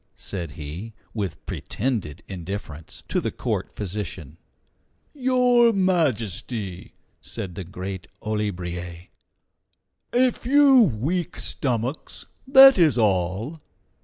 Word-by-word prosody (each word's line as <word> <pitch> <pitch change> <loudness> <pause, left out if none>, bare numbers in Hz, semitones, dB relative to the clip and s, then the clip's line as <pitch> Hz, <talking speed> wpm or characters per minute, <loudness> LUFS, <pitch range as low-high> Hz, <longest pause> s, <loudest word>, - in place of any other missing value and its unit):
said 85 -7 -5
he, 80 +10 -7 0.2
with 100 -8 -4
pretended 105 - -3
indifference, 90 -4 -7
to - - 0
the - - -1
court - - -3
physician. 90 -6 -6 0.7
"Your 250 -3 +4
Majesty," 120 - -1 0.3
said 90 - -6
the 95 - -6
great 95 +1 -6 0.2
Olibriers, 90 -5 -4 1.0
"a 250 +1 +4
few 275 +2 +5
weak 160 - 0
stomachs; 125 +2 -2 0.2
that 270 -4 +9
is 155 -7 +4
all." 105 - 0
105 Hz, 95 wpm, -24 LUFS, -, 1.0 s, that